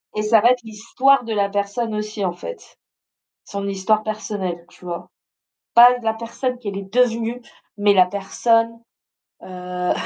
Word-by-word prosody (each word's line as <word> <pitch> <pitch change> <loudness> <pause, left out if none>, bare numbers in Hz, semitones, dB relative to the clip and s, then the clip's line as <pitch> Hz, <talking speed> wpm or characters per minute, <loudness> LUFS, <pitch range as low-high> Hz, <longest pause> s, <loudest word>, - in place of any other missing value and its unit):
Et 215 - 0
ça 215 0 +4
va 240 +3 +6
être 250 -1 0
l'histoire 235 +5 +2
de 225 - -4
la 200 -1 +1
personne 205 +3 -2
aussi 210 -1 -4
en 180 - 0
fait, - - -10 0.7
son 200 0 -5
histoire 200 +2 +1
personnelle, 205 -5 -4
tu - - -18
vois? 175 -1 -6 0.7
Pas 245 +1 +8
la 220 -1 0
personne 240 +3 -4
qu'elle 205 -5 -5
est 195 0 -9
devenue, 240 -1 +1 0.3
mais 205 0 +4
la 185 -1 +6
personne, 230 +4 0 0.6
heu 180 -1 -3
215 Hz, 155 wpm, -21 LUFS, 200-230 Hz, 0.7 s, Pas